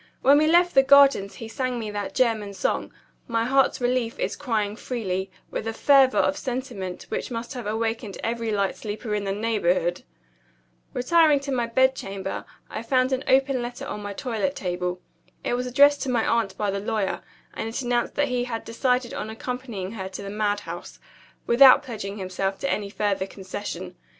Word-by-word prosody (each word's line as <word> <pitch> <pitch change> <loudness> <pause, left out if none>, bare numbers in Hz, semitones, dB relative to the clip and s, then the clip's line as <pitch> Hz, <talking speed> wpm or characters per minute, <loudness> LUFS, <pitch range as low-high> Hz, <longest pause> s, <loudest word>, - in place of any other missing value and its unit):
When 280 +2 +7
we 310 - +3
left 350 +2 +4
the 270 - +7
Gardens 275 -7 +5
he 225 - -7
sang 255 +1 -2
me 220 -3 -4
that 205 -1 -4
German 220 -5 +1
song, - - -1 0.4
'My 230 -1 0
heart's 270 +2 +3
relief 245 -2 0
is - - -2
crying 215 -6 -1
freely,' 195 -6 -3 0.2
with 225 - -3
a 225 - -2
fervor 270 +1 +5
of 285 - +2
sentiment 245 -8 -4
which - - -3
must 235 +2 -5
have 245 -5 -6
awakened 225 -1 -2
every 230 0 -2
light 200 -2 0
sleeper 215 +1 -5
in 205 -1 -1
the 195 - -1
neighborhood. 195 -5 0 0.9
Retiring 300 +3 +4
to 280 0 -4
my 240 -3 0
bedchamber, 230 -6 0 0.2
I - - -5
found 255 +2 +1
an 260 - -1
open 265 -1 +3
letter 240 0 -5
on 210 - -5
my 205 0 -5
toilet 250 +5 -2
table. 180 -1 -3 0.4
It - - -1
was 250 +1 -1
addressed 285 +3 +5
to 270 - -2
my 235 -3 +1
aunt 225 -4 0
by 205 -1 0
the 200 - -2
lawyer; 210 -1 -1 0.3
and 225 - -4
it 225 - -4
announced 240 -1 0
that 290 -1 +1
he 245 -1 0
had 230 -2 -5
decided 250 +1 0
on - - -4
accompanying 225 -4 -5
her 190 -4 -5
to 190 +1 -7
the 200 - -6
madhouse 205 -1 -3 0.5
without 260 +3 +7
pledging 210 -6 -6
himself 195 0 -2
to 275 - 0
any 205 -1 -2
further 200 -2 -1
concession. 185 -2 -6
230 Hz, 185 wpm, -25 LUFS, 200-255 Hz, 0.9 s, When